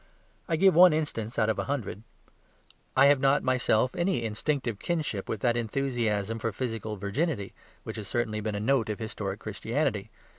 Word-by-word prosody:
I 165 - +2
give 190 +4 +5
one 175 +1 +8
instance 125 -8 -2
out 110 - +3
of 110 - 0
a - - -1
hundred; 125 -8 -3 1.0
I 135 - +7
have 140 -1 +6
not 135 +2 +3
myself 125 -1 +2
any 175 -7 0
instinctive 115 0 -2
kinship 150 - -2
with 110 - -3
that 120 -1 +2
enthusiasm 115 -3 -1
for 115 0 -1
physical 110 -2 -4
virginity, 100 - -2 0.3
which - - -6
has 105 -3 -6
certainly 110 -2 -1
been 105 0 -2
a - - -2
note 115 0 +1
of 105 - -2
historic 105 -3 -4
Christianity. 110 +1 -2
115 Hz, 175 wpm, -28 LUFS, 105-140 Hz, 1.0 s, one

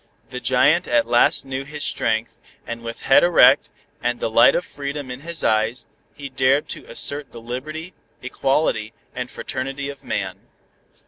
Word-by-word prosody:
The 125 - -4
giant 145 +8 +3
at 120 -1 +2
last 120 +1 +3
knew 135 0 -4
his 145 +1 -6
strength, 110 -3 -1 0.2
and 115 0 -6
with 115 0 -8
head 135 - +5
erect, 175 -1 +5 0.3
and 120 0 -1
the - - -2
light 115 +2 +6
of 180 - -1
freedom 140 -1 -6
in 125 - -6
his 165 +2 -4
eyes, 110 +3 +1 0.3
he 140 -1 -7
dared 135 +2 +1
to - - -6
assert 145 +1 -1
the 115 - -10
liberty, 155 +9 -6 0.3
equality 130 -4 -1 0.2
and 125 0 -5
fraternity 135 +2 -5
of 140 -1 -10
man. 95 -1 -3
130 Hz, 165 wpm, -21 LUFS, 120-145 Hz, 0.3 s, light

